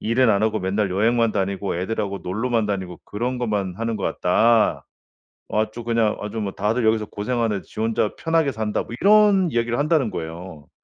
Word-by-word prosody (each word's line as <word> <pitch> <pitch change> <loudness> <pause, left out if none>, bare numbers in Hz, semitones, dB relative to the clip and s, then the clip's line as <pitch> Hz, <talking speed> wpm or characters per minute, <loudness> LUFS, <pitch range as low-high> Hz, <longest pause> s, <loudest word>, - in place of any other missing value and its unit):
일은 115 +2 +3
안 100 0 +2
하고 110 0 +1
맨날 95 +1 0
여행만 115 +4 +2
다니고 100 -1 -2
애들하고 100 +1 -3
놀러만 115 +4 0
다니고 95 -4 -4
그런 125 +4 -3
것만 105 -6 -2
하는 115 +1 -2
것 100 - -6
같다. 110 +5 +2 0.7
아주 110 +2 -1
그냥 115 -2 +1
아주 105 +2 -5
뭐 100 -2 -3
다들 110 +5 -1
여기서 110 -1 +2
고생하는데 110 -1 -2
지 - - -8
혼자 110 -1 0
편하게 165 -3 +1
산다." 110 -2 -2
뭐 - - -9
이런 205 -3 +5
이야기를 120 -1 0
한다는 150 -5 +2
거예요. 80 -2 -7
110 Hz, 390 characters per minute, -22 LUFS, 100-120 Hz, 0.7 s, 이런